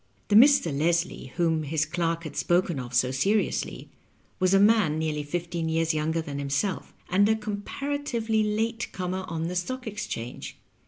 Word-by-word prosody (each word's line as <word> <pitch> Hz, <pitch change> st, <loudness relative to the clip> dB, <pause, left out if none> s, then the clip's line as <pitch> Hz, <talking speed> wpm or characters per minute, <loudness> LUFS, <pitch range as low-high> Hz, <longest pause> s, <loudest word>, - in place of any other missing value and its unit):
The 205 Hz, -, +3 dB
Mr. 240 Hz, -, +6 dB
Leslie, 170 Hz, -1 st, 0 dB
whom 165 Hz, -2 st, +1 dB
his 155 Hz, +1 st, 0 dB
clerk 165 Hz, 0 st, -1 dB
had 155 Hz, -, -7 dB
spoken 175 Hz, -4 st, +1 dB
of 125 Hz, -1 st, -6 dB
so 125 Hz, +1 st, +3 dB
seriously, 200 Hz, +11 st, -1 dB, 0.5 s
was 185 Hz, -1 st, +3 dB
a -, -, +6 dB
man 205 Hz, -7 st, +4 dB
nearly 155 Hz, -1 st, -1 dB
fifteen 170 Hz, +2 st, -3 dB
years 165 Hz, 0 st, +1 dB
younger 160 Hz, +1 st, -1 dB
than 140 Hz, -2 st, -5 dB
himself, 140 Hz, +8 st, -2 dB, 0.2 s
and 200 Hz, +3 st, +3 dB
a 220 Hz, -, +4 dB
comparatively 225 Hz, +2 st, -2 dB
late 225 Hz, +2 st, -1 dB
comer 185 Hz, 0 st, -3 dB
on 165 Hz, 0 st, -3 dB
the 180 Hz, -, -4 dB
Stock 255 Hz, +9 st, -3 dB
Exchange. 200 Hz, -, -6 dB
175 Hz, 160 wpm, -26 LUFS, 155-210 Hz, 0.5 s, Mr